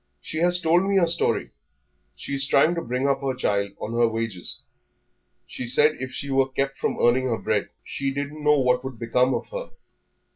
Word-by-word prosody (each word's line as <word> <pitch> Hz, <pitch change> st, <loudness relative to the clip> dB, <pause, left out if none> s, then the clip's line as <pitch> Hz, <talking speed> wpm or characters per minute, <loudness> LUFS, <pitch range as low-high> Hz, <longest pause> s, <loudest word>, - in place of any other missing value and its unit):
"She 160 Hz, -, -5 dB
has 175 Hz, +1 st, +3 dB
told 175 Hz, +2 st, +3 dB
me 200 Hz, -, +3 dB
her 180 Hz, -, +5 dB
story; 170 Hz, -, +1 dB, 0.6 s
she -, -, -7 dB
is 135 Hz, 0 st, +1 dB
trying 155 Hz, +5 st, +4 dB
to 170 Hz, -, -2 dB
bring 125 Hz, +1 st, -1 dB
up 135 Hz, -1 st, +1 dB
her 135 Hz, -2 st, -1 dB
child 100 Hz, -5 st, -1 dB
on 115 Hz, -, -5 dB
her 120 Hz, 0 st, +3 dB
wages.... 115 Hz, -5 st, -4 dB, 0.9 s
She 125 Hz, -, -6 dB
said 150 Hz, +5 st, +4 dB
if 130 Hz, -, -4 dB
she 140 Hz, +2 st, -5 dB
was 135 Hz, 0 st, +2 dB
kept 135 Hz, 0 st, -1 dB
from -, -, -1 dB
earning 125 Hz, +2 st, +3 dB
her 120 Hz, -3 st, 0 dB
bread -, -, -1 dB
she 135 Hz, 0 st, -3 dB
didn't 145 Hz, +2 st, -5 dB
know 150 Hz, 0 st, +4 dB
what 125 Hz, -1 st, +2 dB
would 130 Hz, -3 st, -6 dB
become 125 Hz, +3 st, +1 dB
of -, -, -5 dB
her. -, -, -6 dB
135 Hz, 205 wpm, -24 LUFS, 125-150 Hz, 0.9 s, her